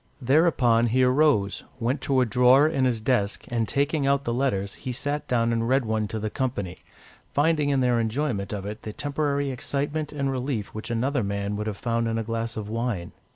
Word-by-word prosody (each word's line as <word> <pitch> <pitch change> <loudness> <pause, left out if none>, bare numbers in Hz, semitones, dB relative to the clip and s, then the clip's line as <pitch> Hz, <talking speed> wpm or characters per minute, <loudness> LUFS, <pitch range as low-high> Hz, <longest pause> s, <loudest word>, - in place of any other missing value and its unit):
Thereupon 130 -4 +3
he 130 +3 +2
arose, 125 -6 +2 0.2
went 125 +4 -1
to 135 -2 +2
a - - +3
drawer 125 +5 +5
in 135 -4 +1
his 120 -3 +1
desk, 110 -3 0
and 115 -2 0
taking 140 +2 0
out 140 0 +2
the 120 - -1
letters, 110 -7 -1
he 130 - -6
sat 145 +4 -3
down 115 -1 +1
and 115 0 0
read 130 -1 +2
one 110 -1 0
to 110 - -4
the 110 0 -3
company, 100 -9 -3 0.6
finding 150 0 +2
in 135 -2 +2
their 125 -2 +2
enjoyment 115 -3 -1
of 100 -2 -4
it 105 +2 -6
the 110 - -7
temporary 145 0 -1
excitement 145 +3 -3
and 140 -2 -1
relief 125 -5 -3
which 110 +2 -6
another 125 +2 0
man 100 0 -2
would 105 +1 -3
have 105 -2 -3
found 115 0 -1
in 115 0 -1
a 115 - -1
glass 115 0 -3
of 105 -2 -4
wine. 115 -5 -3
125 Hz, 205 wpm, -25 LUFS, 110-140 Hz, 0.6 s, drawer